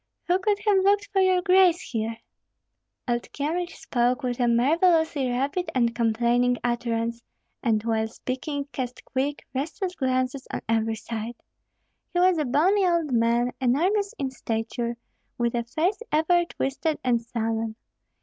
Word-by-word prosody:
who 360 +1 +2
could 410 +2 +1
have 410 -2 +5
looked 405 +1 +3
for 385 - +4
your 370 -1 +3
grace 365 -2 +5
here!" 225 -1 -2 0.9
Old 240 -1 -2
Kyemlich 340 +5 -2
spoke 250 -3 0
with 245 -1 -2
a 245 - +3
marvellously 310 +3 +3
rapid 280 +9 -1
and 235 -2 +2
complaining 235 +2 +2
utterance, 235 -1 -1 0.4
and 220 -4 +1
while 220 -1 0
speaking 275 +5 -4
cast 250 -2 -5
quick, 280 +2 -2
restless 330 +8 -3
glances 255 -2 -1
on - - -3
every 225 0 +1
side. 225 +1 -5 0.8
He - - +3
was 360 -2 +4
a 300 - +1
bony 345 +11 +3
old 340 -5 +1
man, 235 +1 +2
enormous 380 - +1
in 265 -1 -2
stature, 235 -1 -3 0.4
with 235 -1 0
a 235 -1 0
face 335 - 0
ever 345 +3 +3
twisted 290 0 -2
and 240 -2 +2
sullen! 225 -1 -2
260 Hz, 145 wpm, -25 LUFS, 235-340 Hz, 0.9 s, have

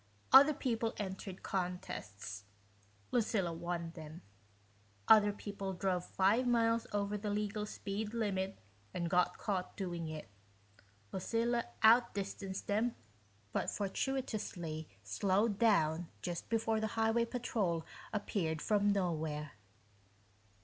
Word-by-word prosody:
Other 280 +3 +9
people 230 -5 -1
entered 190 -1 -5
contests 175 - -4 0.7
Lucilla 205 -7 +1
won 170 0 -3
them. 160 0 -10 0.8
Other 210 -2 +7
people 200 -1 -5
drove 180 -1 0
five 210 +7 +3
miles 230 -1 +3
over 205 0 -1
the 210 +1 -3
legal 210 0 -1
speed 205 +1 -4
limit 195 -4 -1 0.4
and 170 -1 -1
got 180 -1 +3
caught 190 -4 -2
doing 175 -4 -3
it 155 -1 -6 0.8
Lucilla 230 +5 0 0.2
out 230 +1 +6
distanced 195 -1 -4
them, 220 +4 +1 0.6
but - - 0
fortuitously 195 - -3
slowed 195 - +1
down 165 -7 +3
just 175 -2 -4
before 225 -1 +1
the 220 - 0
highway 225 +1 +3
patrol 210 -9 -1 0.3
appeared 185 -6 -1
from 205 +3 +2
nowhere. 160 -6 -1
200 Hz, 110 wpm, -35 LUFS, 175-220 Hz, 0.8 s, Other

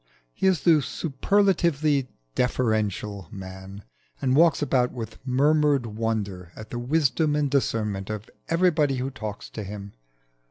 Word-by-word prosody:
He - - 0
is 185 -4 +3
the 160 -4 +5
superlatively 155 -2 +1 0.2
deferential 105 - -1
man, 95 +1 -9 0.4
and 130 -1 +1
walks 160 -1 +4
about 125 -3 +2
with 110 -3 -7
murmured 145 0 +3
wonder 105 -5 -3
at 110 - -10
the 120 - -3
wisdom 150 +3 +1
and 145 -2 0
discernment 105 -8 0
of 110 0 -5 0.2
everybody 165 -5 +3
who 130 +2 -3
talks 110 -6 -6
to 110 - -5
him. 100 0 -8
125 Hz, 130 wpm, -25 LUFS, 105-150 Hz, 0.4 s, the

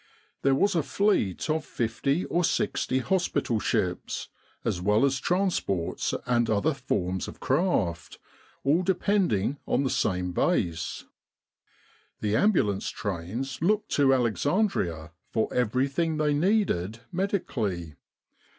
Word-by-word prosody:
There 135 0 +3
was 200 +9 +2
a 165 - +2
fleet 175 - +1
of 155 0 0
50 140 +7 -1
or 175 - 0
60 130 - 0
hospital 145 - 0
ships, 90 -3 -1 0.4
as 90 - -1
well 105 +6 +3
as 135 -1 +1
transports 175 - 0
and 120 -1 +2
other 110 +9 +2
forms 95 -8 -2
of - - -9
craft, 130 - 0 0.5
all 150 +6 +3
depending 180 - +1
on - - +2
the 130 - 0
same 90 -2 0
Base. 85 -1 -1 1.1
The 105 0 0
ambulance 115 - +2
trains 105 - -4
looked 210 +5 +1
to 140 -2 +3
Alexandria 120 - 0 0.2
for 110 - -1
everything 135 +7 +1
they 150 -1 +2
needed 145 - +1
medically. 125 - -2
130 Hz, 115 wpm, -27 LUFS, -, 1.1 s, There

